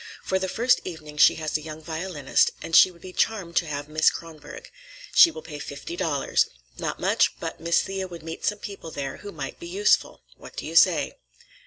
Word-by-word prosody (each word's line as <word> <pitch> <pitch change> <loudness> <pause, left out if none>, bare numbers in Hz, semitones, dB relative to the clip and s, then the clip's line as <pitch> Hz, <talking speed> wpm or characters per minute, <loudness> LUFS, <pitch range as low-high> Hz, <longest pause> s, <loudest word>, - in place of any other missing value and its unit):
For 190 - 0
the 190 0 -2
first 240 +6 +2
evening 155 -4 -8
she - - +6
has 155 -1 -4
a 155 - +1
young 155 0 -8
violinist, 160 -2 0
and 165 - -1
she - - +9
would 170 -2 -18
be 185 -1 -9
charmed 190 -7 -1
to 170 - +2
have 145 -1 -4
Miss 155 +1 +4
Kronborg. 155 -3 -10 0.4
She 340 - +9
will 325 - -9
pay 150 -2 -8
fifty 145 +3 -7
dollars. 145 -5 +1 0.3
Not - - -3
much, - - +2
but - - -5
Miss 170 +1 +2
Thea 190 -1 -4
would 170 -3 -10
meet 160 0 -7
some 210 - 0
people 200 -5 -8
there 140 -3 -5
who 205 - -9
might 140 -6 -7
be 170 - -8
useful. 200 +4 +1
What - - -13
do - - -5
you - - -6
say?" - - +4
165 Hz, 210 wpm, -25 LUFS, 155-190 Hz, 0.4 s, she